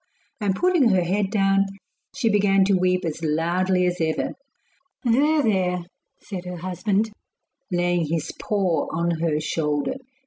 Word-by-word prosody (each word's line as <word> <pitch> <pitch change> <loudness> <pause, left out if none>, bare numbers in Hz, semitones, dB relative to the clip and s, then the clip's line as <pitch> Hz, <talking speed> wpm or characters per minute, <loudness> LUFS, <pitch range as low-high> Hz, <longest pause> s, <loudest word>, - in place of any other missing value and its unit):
And 200 -3 0
putting 345 - +3
her 185 -3 +3
head 195 +3 0
down, 195 -2 +3 0.5
she 270 -4 0
began 200 -2 +4
to 200 - +2
weep 185 -1 +2
as 160 0 -4
loudly 180 +4 +1
as 180 0 0
ever. 160 -1 0 0.7
'There! 290 +5 +3
there!' 180 -5 +1 0.4
said 185 -3 -7
her 180 0 -5
husband, 195 +5 -1 0.6
laying 175 -2 +1
his 160 0 -2
paw 195 -5 0
on 170 0 -1
her 160 -2 +1
shoulder. 150 - -1
185 Hz, 140 wpm, -23 LUFS, 170-205 Hz, 0.7 s, began